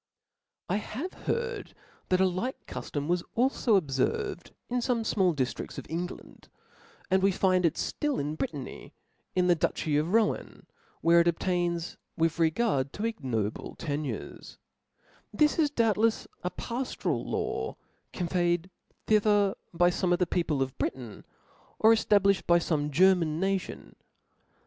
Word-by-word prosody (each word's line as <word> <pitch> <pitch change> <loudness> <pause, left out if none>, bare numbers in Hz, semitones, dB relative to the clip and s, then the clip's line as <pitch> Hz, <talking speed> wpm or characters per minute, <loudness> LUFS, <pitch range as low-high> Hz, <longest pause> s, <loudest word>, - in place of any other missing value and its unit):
I - - +1
have 260 - -5
heard 470 -3 -3 0.3
that 185 - +3
a 190 - +5
like 185 +8 -2
cuftom 145 -1 -4
was 175 +1 +1 0.2
alfo 240 -3 +3
ob 160 -7 -1
jerved 410 - -1 0.2
in 250 0 -1
fome 240 -1 0
fmall 190 -6 +2
diftridls 130 -3 -3
of - - -6
England 175 +2 -5
t - - -22 0.6
and 190 0 +4
we 195 +1 +4
find 185 -1 +3
it 160 - -2
ftill 295 -2 -1
in 145 +2 -2
Brittany, 145 -3 -6 0.4
in 180 -1 +3
the 180 - +5
dutchy 155 -2 0
of 155 +4 0
Rohan, 220 -1 0 0.4
where 170 +1 +5
it 170 - +4
obtains 170 0 -1 0.2
with 165 0 +1
regard 160 - +1
to 205 - -5
ignoble 125 - -3
tenures^ 145 -7 -5 0.7
This 300 +9 +2
is 305 -2 +4
doubtlefs 225 -4 +2 0.2
a 180 - 0
paftoral 245 +7 -3
law - - -2 0.4
conveyed 175 0 0 0.3
thither 205 -2 +3 0.2
by 175 +1 +3
fome 180 0 +1
of - - +3
the 180 - +2
people 165 -5 0
of 130 0 -7
Britain^ 120 -6 -4 0.5
or 220 - +6
eftablifhed 200 -3 +3
by 170 - +6
fome 155 -3 0
German 165 0 +3
natioil. 195 0 -2
180 Hz, 145 wpm, -29 LUFS, 160-215 Hz, 0.7 s, or